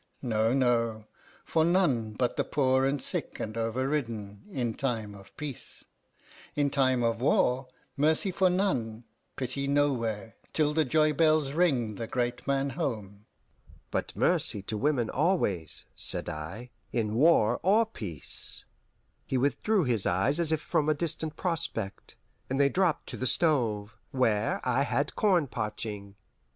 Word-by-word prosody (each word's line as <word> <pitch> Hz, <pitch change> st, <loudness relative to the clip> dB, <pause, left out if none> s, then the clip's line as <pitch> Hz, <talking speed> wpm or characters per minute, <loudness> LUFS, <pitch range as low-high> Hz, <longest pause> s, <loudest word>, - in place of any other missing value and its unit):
No, 110 Hz, -2 st, +1 dB
no: 115 Hz, -4 st, +1 dB, 0.4 s
for 160 Hz, -, +2 dB
none 150 Hz, -, +2 dB
but 120 Hz, +3 st, -1 dB
the -, -, +1 dB
poor 130 Hz, -2 st, +2 dB
and 140 Hz, +1 st, 0 dB
sick -, -, -5 dB
and 110 Hz, 0 st, -4 dB
overridden, 115 Hz, -3 st, -2 dB
in 125 Hz, -, -2 dB
time 115 Hz, -6 st, -3 dB
of 100 Hz, -1 st, -15 dB
peace; 145 Hz, -4 st, -7 dB, 0.7 s
in 145 Hz, -1 st, +1 dB
time 130 Hz, -3 st, +2 dB
of 115 Hz, 0 st, 0 dB
war, 130 Hz, -1 st, +2 dB, 0.3 s
mercy 155 Hz, +6 st, +1 dB
for 185 Hz, 0 st, +3 dB
none, 125 Hz, -, -1 dB, 0.3 s
pity 135 Hz, +2 st, -3 dB
nowhere, 115 Hz, -7 st, 0 dB, 0.2 s
till 150 Hz, -1 st, +1 dB
the 160 Hz, 0 st, +2 dB
joybells 155 Hz, 0 st, +3 dB
ring 135 Hz, -10 st, +1 dB
the 115 Hz, -, -4 dB
great 120 Hz, 0 st, -2 dB
man 140 Hz, 0 st, 0 dB
home." 105 Hz, -5 st, -5 dB, 0.6 s
"But -, -, -3 dB
mercy 100 Hz, -, +1 dB
to 110 Hz, -, -4 dB
women 125 Hz, 0 st, +1 dB
always," 105 Hz, -, 0 dB
said -, -, -1 dB
I, 95 Hz, +11 st, -7 dB, 0.2 s
"in 110 Hz, -3 st, -1 dB
war 120 Hz, -4 st, +4 dB
or 210 Hz, +5 st, +4 dB
peace." 100 Hz, -, +3 dB, 0.6 s
He 130 Hz, -, 0 dB
withdrew 180 Hz, -, +1 dB
his 120 Hz, -7 st, +1 dB
eyes 95 Hz, -, +2 dB
as 165 Hz, -2 st, +2 dB
if 160 Hz, -1 st, 0 dB
from 150 Hz, 0 st, 0 dB
a 155 Hz, -, +3 dB
distant 160 Hz, 0 st, -3 dB
prospect, 115 Hz, -, -3 dB, 0.3 s
and 135 Hz, +1 st, -1 dB
they 140 Hz, 0 st, +5 dB
dropped 180 Hz, 0 st, +1 dB
to -, -, -6 dB
the 130 Hz, -, 0 dB
stove, 115 Hz, -9 st, +1 dB
where 115 Hz, -5 st, 0 dB
I 125 Hz, +2 st, +2 dB
had 145 Hz, +1 st, -1 dB
corn 185 Hz, -7 st, +3 dB
parching. 105 Hz, -4 st, -5 dB
130 Hz, 145 wpm, -28 LUFS, 110-150 Hz, 0.7 s, they